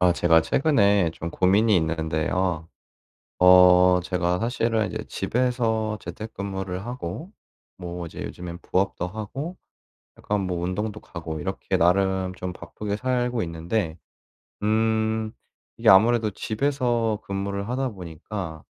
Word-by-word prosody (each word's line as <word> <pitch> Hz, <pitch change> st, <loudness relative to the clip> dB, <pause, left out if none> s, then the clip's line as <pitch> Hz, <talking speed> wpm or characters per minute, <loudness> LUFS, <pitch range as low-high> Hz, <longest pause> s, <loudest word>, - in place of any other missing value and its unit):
아 90 Hz, -1 st, +5 dB
제가 85 Hz, -1 st, +4 dB
최근에 100 Hz, -, +3 dB
좀 85 Hz, 0 st, -6 dB
고민이 100 Hz, +5 st, +3 dB
있는데요. 80 Hz, +1 st, -1 dB, 0.7 s
어 90 Hz, 0 st, +7 dB
제가 90 Hz, 0 st, 0 dB
사실은 115 Hz, -2 st, 0 dB
이제 110 Hz, 0 st, -5 dB
집에서 110 Hz, -1 st, 0 dB
재택근무를 95 Hz, -3 st, -5 dB
하고 125 Hz, -, -6 dB, 0.5 s
뭐 90 Hz, -1 st, -6 dB
이제 80 Hz, -, -9 dB
요즘엔 85 Hz, -1 st, -7 dB
부업도 95 Hz, -1 st, -1 dB
하고 110 Hz, -, -6 dB, 0.6 s
약간 105 Hz, 0 st, -2 dB
뭐 90 Hz, -2 st, -2 dB
운동도 105 Hz, +4 st, -3 dB
가고 80 Hz, -3 st, -6 dB
이렇게 -, -, -2 dB
나름 95 Hz, +1 st, +2 dB
좀 90 Hz, -1 st, -5 dB
바쁘게 100 Hz, +4 st, -5 dB
살고 125 Hz, 0 st, 0 dB
있는데 85 Hz, +1 st, -2 dB, 0.6 s
음 110 Hz, 0 st, +1 dB, 0.5 s
이게 -, -, +1 dB
아무래도 110 Hz, +3 st, +6 dB
집에서 120 Hz, 0 st, 0 dB
근무를 100 Hz, +1 st, -3 dB
하다 130 Hz, +2 st, -1 dB
보니까 85 Hz, -3 st, -7 dB
100 Hz, 265 characters per minute, -25 LUFS, 90-110 Hz, 0.7 s, 어